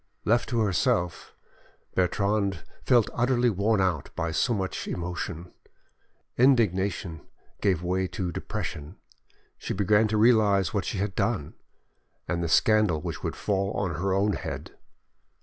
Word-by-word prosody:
Left 115 +2 +2
to 120 -3 +1
herself, 90 -3 0 0.6
Bertrande 100 0 0 0.2
felt 120 -4 +4
utterly 120 0 +2
worn 105 +2 +1
out 90 -7 0
by 80 0 -2
so 100 +10 +1
much 95 -4 -2
emotion; 90 0 -5 0.9
indignation 100 - +2 0.4
gave 95 -4 +1
way 95 +1 0
to 90 0 -4
depression. 75 0 -5 0.6
She - - -4
began 105 +2 +3
to 110 0 0
realise 105 -4 +4
what 100 -2 -1
she - - -3
had 100 +1 -2
done, 105 -11 -1 0.7
and 85 0 -1
the 85 - -2
scandal 105 0 +3
which - - -5
would - - -3
fall 100 -1 -1
on 95 -4 -2
her 95 0 0
own 100 +2 +2
head. - - -5
100 Hz, 135 wpm, -27 LUFS, 90-110 Hz, 0.9 s, felt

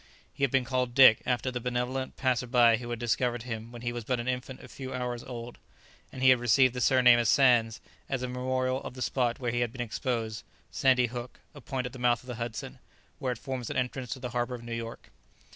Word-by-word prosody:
He - - -5
had 135 - +4
been 130 0 +1
called 125 -1 -1
Dick, 130 -5 +8
after 125 +1 0
the 125 - -3
benevolent 125 +2 -3
passer 125 -2 0
by 120 -2 +5
who 120 0 -8
had 120 - -3
discovered 120 0 -1
him 115 -1 -6
when 120 0 -10
he 120 0 -2
was 120 -1 -5
but 125 +2 -1
an 120 - -4
infant 130 +1 -4
a - - -10
few 130 -1 -8
hours 125 -1 -3
old, 120 -1 -8 0.5
and 130 - -6
he 130 - +8
had 130 - +4
received 120 +2 +4
the 125 - -4
surname 125 -1 +6
of 120 - +1
Sands 120 -4 +4 0.3
as 130 -2 -2
a - - -1
memorial 130 +1 -1
of - - -8
the 130 - -3
spot 125 -3 0
where 120 -2 -1
he 120 - -1
had 120 -2 0
been 125 - -12
exposed, 115 -2 -3 0.3
Sandy 130 -2 +3
Hook, 120 +1 -7
a 145 - -12
point 130 0 -3
at 125 - -6
the 130 - -9
mouth 120 0 +2
of - - -18
the 125 -3 -6
Hudson, 115 -2 -5 0.4
where 130 -2 -1
it - - -10
forms 130 -2 -5
an - - -3
entrance 125 0 -2
to - - -9
the 125 -1 -5
harbour 120 +1 -1
of 120 - -10
New 120 0 -6
York. 115 0 -7
125 Hz, 245 wpm, -29 LUFS, 120-130 Hz, 0.5 s, Dick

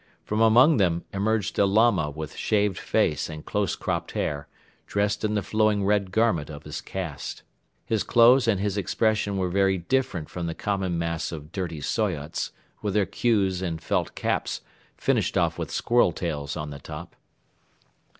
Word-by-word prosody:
From 105 +1 -1
among 120 +7 +6
them 85 -4 +1
emerged 105 +1 0
a 100 - +6
Lama 105 -6 +3
with 80 +1 -7
shaved 105 -3 +1
face 75 +1 +1
and 75 -1 -8
close 105 -4 0
cropped - - -3
hair, 70 -1 -2 0.4
dressed 105 +1 0
in 105 0 0
the 105 - 0
flowing 110 0 +2
red 100 -1 +2
garment 95 -8 +1
of 75 -1 -8
his - - -6
caste. 85 -8 -5 0.4
His 110 -2 0
clothes 120 +2 +5
and 105 -4 +2
his 100 0 -1
expression 105 +1 0
were 95 -1 0
very 95 0 +3
different 95 -2 -1
from 85 -1 -4
the 80 - -3
common 95 -4 -1
mass 85 -1 -2
of 75 -1 -8
dirty 85 -5 -4
Soyots 75 +1 -1 0.3
with 105 -1 -2
their 105 -2 +3
queues 95 -6 +1
and 85 -4 -2
felt - - -1
caps - - -1 0.4
finished - - +1
off - - +1
with - - -3
squirrel 120 -6 +3
tails 75 -4 -3
on 75 -1 -4
the 70 - -8
top. - - -9
95 Hz, 170 wpm, -26 LUFS, 85-105 Hz, 0.4 s, among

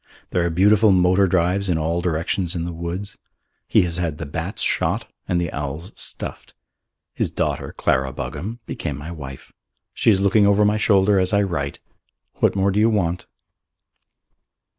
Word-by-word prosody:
There 90 - +1
are 85 - +1
beautiful 100 +5 +4
motor 90 +1 +4
drives 95 +2 +1
in 85 - +2
all 80 +2 -1
directions 85 +1 -1
in 85 -1 -2
the 85 - -4
woods. 85 +4 -5 0.5
He - - +4
has 85 0 -2
had 85 -4 -2
the 85 - -5
bats 80 +7 -3
shot - - 0 0.2
and 90 - +1
the 85 -1 -3
owls 75 +6 -5
stuffed. - - -3 0.6
His - - -1
daughter, - - -2
Clara 65 +1 +1
Buggam, 110 - -5
became 70 -2 -4
my 75 +4 -7
wife. 70 -5 -9 0.4
She - - +2
is 100 -3 +4
looking 100 +1 +4
over 100 +1 +4
my 105 +1 +2
shoulder 100 -2 +3
as 95 +2 0
I 100 0 +4
write. 80 -7 -3 0.6
What - - +2
more 100 0 +2
do 100 - 0
you 110 +2 +4
want? 90 -5 -1
90 Hz, 170 wpm, -22 LUFS, 85-100 Hz, 0.6 s, beautiful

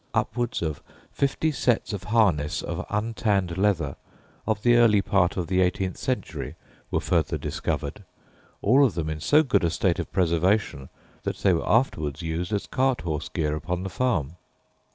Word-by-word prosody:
Upwards 120 -5 -1
of 80 -3 -3 0.3
fifty 140 +3 0
sets 125 -5 0
of 100 - -5
harness 95 -10 +2
of - - -4
untanned 105 -4 0
leather 100 -1 0 0.5
of 110 -2 -1
the 120 0 +5
early 115 -3 +5
part 95 -2 +1
of 90 - -1
the 95 +2 +1
eighteenth 90 0 0
century - - -3 0.3
were - - 0
further - - 0
discovered, - - -3 0.6
all 130 +7 +5
of 130 - +2
them 80 -2 -2
in 75 - -4
so 150 - +4
good 110 - +1
a 85 - +3
state 85 +1 0
of - - -4
preservation 85 -4 +1 0.3
that - - -3
they 95 - +3
were 80 - -1
afterwards 80 - +1
used 85 +3 -3
as 100 -2 -1
cart 130 -1 0
horse 80 -4 -3
gear 75 -1 -1
upon 90 +3 -3
the 95 - -5
farm. 90 - -1
95 Hz, 170 wpm, -25 LUFS, 85-115 Hz, 0.6 s, the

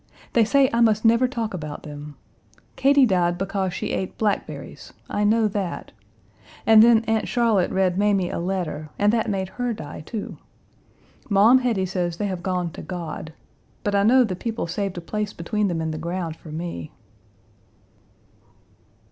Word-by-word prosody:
They 230 -2 +4
say 275 +4 +4
I 235 - +2
must 220 -1 +3
never 230 +3 +5
talk 230 -4 -3
about 155 -4 -6
them. 145 0 -9 0.6
Katie 275 0 +5
died 175 -5 +1
because 195 0 -2
she - - -4
ate 190 - -3
blackberries, 210 -2 -3 0.2
I 205 - 0
know 220 +1 +3
that, 195 -3 -4 0.7
and 220 -1 +8
then 230 0 +5
Aunt 220 -1 0
Charlotte 230 -6 +2
read 185 -1 +1
Mamie 200 -3 +2
a - - -3
letter 170 -4 -3
and 205 +1 +3
that 230 -1 +1
made 190 -2 -1
her 245 -1 0
die, 150 -7 -8
too. 205 +7 -6 0.9
Maum 215 +6 +6
Hetty 230 -7 0
says 175 -2 -2
they 205 - -2
have 185 -3 -3
gone 180 -2 -2
to - - -9
God, 165 -3 -6 0.5
but 205 - -1
I 200 - +3
know 250 +5 +5
the 195 -6 -2
people 225 +3 -3
saved 190 +2 -3
a - - -4
place 210 +4 -3
between 210 +5 -1
them 170 -3 -2
in 160 0 -2
the 155 - -5
ground 170 -1 -3
for 160 - -14
me." 155 - -5
195 Hz, 170 wpm, -23 LUFS, 175-220 Hz, 0.9 s, and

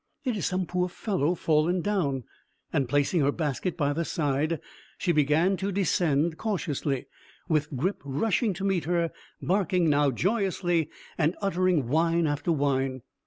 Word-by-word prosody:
"It 250 -3 0
is 200 - -1
some 185 0 -1
poor 180 +1 -1
fellow 180 -4 0
fallen 165 +3 +2
down;" 155 -10 0 0.5
and, 135 -3 +1
placing 145 +5 +2
her 140 0 +3
basket 155 +2 -2
by 145 -3 +1
the 165 +3 -1
side, 155 0 0 0.4
she 180 - +1
began 155 +5 +3
to 195 +3 -2
descend 165 -4 +1
cautiously, 150 - -2 0.4
with 150 -3 0
Grip 185 +10 -1
rushing 195 - 0
to 195 - -6
meet 190 -6 +1
her, 170 0 +1 0.3
barking 180 -3 +2
now 145 0 +3
joyously, 175 - 0 0.3
and 160 +2 +2
uttering 185 - +1
whine 165 +4 +2
after 150 +3 0
whine. 135 -4 0
165 Hz, 150 wpm, -27 LUFS, 145-185 Hz, 0.5 s, her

